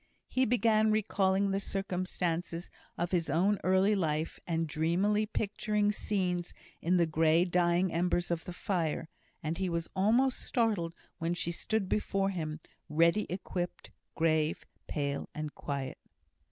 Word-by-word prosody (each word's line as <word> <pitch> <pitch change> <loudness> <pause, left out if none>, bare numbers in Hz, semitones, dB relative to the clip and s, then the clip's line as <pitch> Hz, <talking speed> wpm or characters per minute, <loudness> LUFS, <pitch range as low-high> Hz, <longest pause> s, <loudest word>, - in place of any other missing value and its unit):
He 260 0 +2
began 220 -2 +3
recalling 200 -2 +2
the 195 - +1
circumstances 180 -3 -2 0.3
of 175 +1 -1
his 170 -4 +1
own 190 +7 +2
early 190 +3 +4
life, 160 -5 -1
and 165 -1 0
dreamily 180 +8 +1
picturing 210 0 0
scenes 180 -4 -1 0.3
in 180 +2 +2
the 170 - +4
grey 160 +2 +3
dying 175 0 +2
embers 175 +1 +1
of 170 -1 -1
the - - -5
fire; 170 -4 -2 0.3
and 160 +3 -2
he 190 -1 0
was 170 -1 -2
almost 235 +7 +3
startled 205 -9 0 0.2
when 170 +1 0
she 170 0 -1
stood 200 +3 -1
before 195 -1 0
him, 155 -4 -4 0.3
ready 170 +7 +3
equipped, 180 -1 -4 0.2
grave, 160 -1 +1 0.2
pale, 140 -2 -2
and 155 -1 -4
quiet. 140 -2 -4
180 Hz, 140 wpm, -31 LUFS, 165-200 Hz, 0.3 s, early